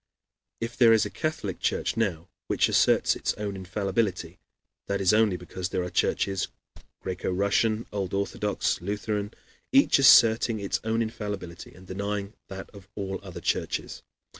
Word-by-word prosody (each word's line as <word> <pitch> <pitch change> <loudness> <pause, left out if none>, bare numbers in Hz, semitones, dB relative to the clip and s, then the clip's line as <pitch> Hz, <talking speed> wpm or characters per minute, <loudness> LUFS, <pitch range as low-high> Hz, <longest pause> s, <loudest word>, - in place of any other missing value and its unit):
If 115 +1 -4
there 115 -2 +6
is 110 - +4
a - - -5
Catholic 155 - -3
Church - - -1
now 95 -7 -1 0.2
which - - +2
asserts - - +3
its - - -2
own 105 -1 -4
infallibility, 95 -2 -2 0.5
that 100 0 -1
is 95 0 +3
only 105 -4 +3
because 90 0 -5
there 90 - -1
are 90 - -5
churches 95 +2 0 0.5
Greco 95 -1 -3
Russian, 105 +4 +1
Old 100 -3 -3
Orthodox, 100 +1 -1
and 90 - -10
Lutheran 105 0 -2 0.4
each 275 - +5
asserting 115 -3 +6
its 100 -1 -1
own 115 +1 +1
infallibility 105 -6 -6
and 95 +1 -15
denying 100 +2 -4
that 95 0 -8
of 100 -3 -14
all 95 -1 -4
other 95 -3 -9
churches. - - -2
100 Hz, 155 wpm, -27 LUFS, 95-110 Hz, 0.5 s, there